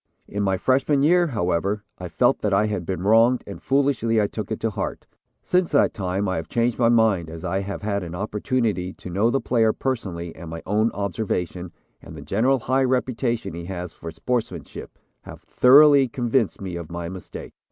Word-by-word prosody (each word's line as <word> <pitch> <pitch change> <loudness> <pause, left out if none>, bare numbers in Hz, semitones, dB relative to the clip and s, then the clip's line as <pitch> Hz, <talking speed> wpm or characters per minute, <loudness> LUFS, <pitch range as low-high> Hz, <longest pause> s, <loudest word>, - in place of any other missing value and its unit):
"In 100 - -4
my 95 -1 +1
freshman 135 +5 +2
year, 175 +3 +4
however, 100 - -1 0.2
I 90 - -5
felt 120 +10 +2
that 100 -2 +1
I 105 +2 +3
had 105 -5 -3
been 95 -2 -3
wronged, 115 +4 +4
and 100 - -9
foolishly 135 -5 +1
I 105 - +3
took 105 +1 -5
it 110 - -2
to 115 - 0
heart. 100 -1 -4 0.4
Since 180 -1 +1
that 140 - +3
time 95 0 -2
I 95 - -1
have 80 0 -5
changed 120 0 0
my 115 -2 +4
mind 110 -8 +2
as 80 +2 -8
I 95 +2 -1
have 100 +1 -5
had 100 -1 -1
an 85 -1 -6
opportunity 105 -1 -1
to 90 - -10
know 100 +6 +2
the 135 - +1
player 115 -3 +2
personally 90 -10 -4
and 85 0 -9
my 80 0 -7
own 105 +3 +2
observation 90 -3 -3 0.3
and - - -11
the - - -9
general 125 +5 +1
high 130 +2 +1
reputation 125 -4 -1
he 85 0 -7
has 90 -2 -6
for 85 - -8
sportsmanship 110 - -4 0.2
have - - -12
thoroughly 140 +1 +6
convinced 120 -3 0
me 90 -3 -5
of 85 -2 -8
my 85 0 -4
mistake. 95 +1 -9
105 Hz, 195 wpm, -23 LUFS, 90-125 Hz, 0.4 s, thoroughly